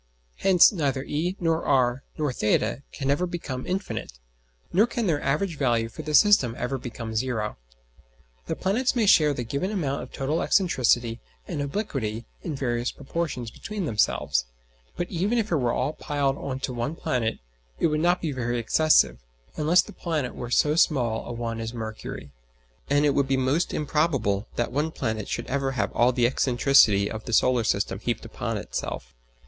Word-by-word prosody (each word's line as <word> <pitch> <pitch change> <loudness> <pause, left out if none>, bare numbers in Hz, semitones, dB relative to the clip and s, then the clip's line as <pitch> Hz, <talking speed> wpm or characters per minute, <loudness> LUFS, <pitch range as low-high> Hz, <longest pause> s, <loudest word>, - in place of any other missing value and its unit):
Hence 185 -3 +6
neither 140 - -1
e 165 +6 -2
nor 165 -1 +1
r 130 -2 +2 0.2
nor 150 -4 -1
[theta] 105 +4 +1
can 135 0 -1
ever 180 +6 +1
become 150 -8 -5
infinite, 190 - -3 0.6
nor 210 +6 +5
can 235 -1 -2
their 155 -6 +1
average 150 +4 -1
value 120 -4 +1
for 135 - -8
the 150 0 -1
system 140 - +5
ever 130 +2 -2
become 115 -2 -6
zero. 110 -3 -1 0.9
The - - -1
planets 245 +8 0
may 230 -3 +2
share 155 -6 +6
the 125 -3 -3
given 140 - -2
amount 155 -10 -2
of - - -9
total 145 +4 -1
excentricity 120 - +2 0.3
and 145 - -3
obliquity 135 - -3 0.2
in 160 -5 -4
various 120 -2 -1
proportions 140 -5 -4
between 210 - -5
themselves; 105 - +1 0.5
but 175 - -2
even 195 +7 0
if 215 -3 -1
it 165 - +3
were 125 -4 +1
all 150 - -1
piled 140 -3 -1
on 130 -1 -4
to 130 - -3
one 120 +6 -3
planet 115 -7 -1 0.4
it - - 0
would 155 -2 +2
not 175 +2 +2
be 160 - 0
very 120 -2 -2
excessive, 115 - +3 0.4
unless 160 +4 +4
the - - -12
planet 155 -7 -2
were 120 - -6
so 150 +4 +3
small 125 -9 +1
a - - -5
one 115 -1 -4
as 115 +1 -5
Mercury; 110 -10 -6 0.6
and 145 +1 +3
it 145 - +4
would 140 -1 +1
be 135 0 +1
most 130 +6 +1
improbable 140 -10 0
that 120 - -1
one 150 +5 0
planet 110 -8 -3
should 120 - -3
ever 135 +1 -1
have 105 -5 -1
all 120 +1 +4
the 120 -1 +2
excentricity 120 -5 +4
of 110 0 -6
the 120 - -4
solar 125 0 +4
system 100 -2 0
heaped 120 +1 -3
upon - - -4
itself. - - -5
135 Hz, 180 wpm, -25 LUFS, 120-160 Hz, 0.9 s, Hence